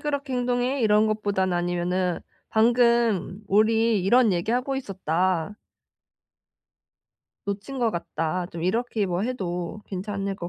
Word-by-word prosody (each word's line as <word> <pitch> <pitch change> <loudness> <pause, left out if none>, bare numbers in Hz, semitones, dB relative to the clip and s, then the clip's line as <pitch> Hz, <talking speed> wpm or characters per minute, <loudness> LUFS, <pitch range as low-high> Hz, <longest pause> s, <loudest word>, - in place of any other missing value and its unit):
그렇게 285 -3 -2
행동해?" 245 +1 0
이런 210 0 +4
것보다는 200 -4 0
아니면은 175 +1 -1 0.3
"방금 235 -4 +2
우리 220 0 +3
이런 225 +2 +4
얘기 175 +5 -1
하고 255 +2 0
있었다." 185 - -1 1.9
'놓친 200 +7 -4
것 235 -2 +2
같다.' 170 0 -3
좀 165 -2 -7
이렇게 220 +2 0
뭐 180 +2 -1
해도 190 -5 -4
괜찮을 195 0 -3
것 175 -2 -6
205 Hz, 260 characters per minute, -25 LUFS, 180-235 Hz, 1.9 s, 이런